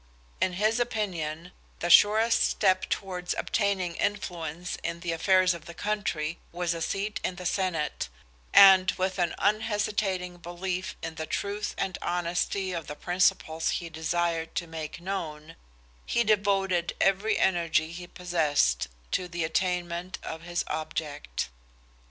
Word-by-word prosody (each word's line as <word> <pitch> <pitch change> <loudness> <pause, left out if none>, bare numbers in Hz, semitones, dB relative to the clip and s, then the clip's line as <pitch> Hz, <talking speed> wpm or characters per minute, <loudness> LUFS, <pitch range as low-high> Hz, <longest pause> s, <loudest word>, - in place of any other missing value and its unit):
In 185 - +2
his 215 +5 +1
opinion 180 -8 -2 0.3
the 175 - 0
surest 220 +5 +6
step 185 -2 +2
towards 180 -2 -2
obtaining 195 -5 0
influence 175 -4 -2
in 170 +1 -4
the 175 -1 -2
affairs 185 +2 +4
of 170 -1 -9
the 170 - -9
country 175 -7 -2
was 175 0 -1
a 165 - -5
seat 200 +5 -2
in 185 - -1
the 180 0 -8
senate, 180 - -1 0.4
and 190 -1 +8
with 185 0 -1
an 175 - +1
unhesitating 205 -4 0
belief 180 +1 -4
in 165 - -4
the 155 - -4
truth 205 +1 -2
and 185 -2 -2
honesty 180 +2 -1
of 165 -3 -4
the 150 - -5
principles 165 -2 +1
he 170 - -6
desired 165 0 -1
to 170 - -1
make 160 0 -6
known, 165 -4 -5 0.5
he 235 - +2
devoted 195 -5 +2
every 200 +3 +2
energy 165 -3 +2
he 175 +1 -8
possessed 155 - +1 0.2
to 180 - 0
the 170 -1 -3
attainment 175 +1 -1
of 160 0 -6
his 175 +1 -2
object. 155 - -4
180 Hz, 140 wpm, -28 LUFS, 165-195 Hz, 0.5 s, and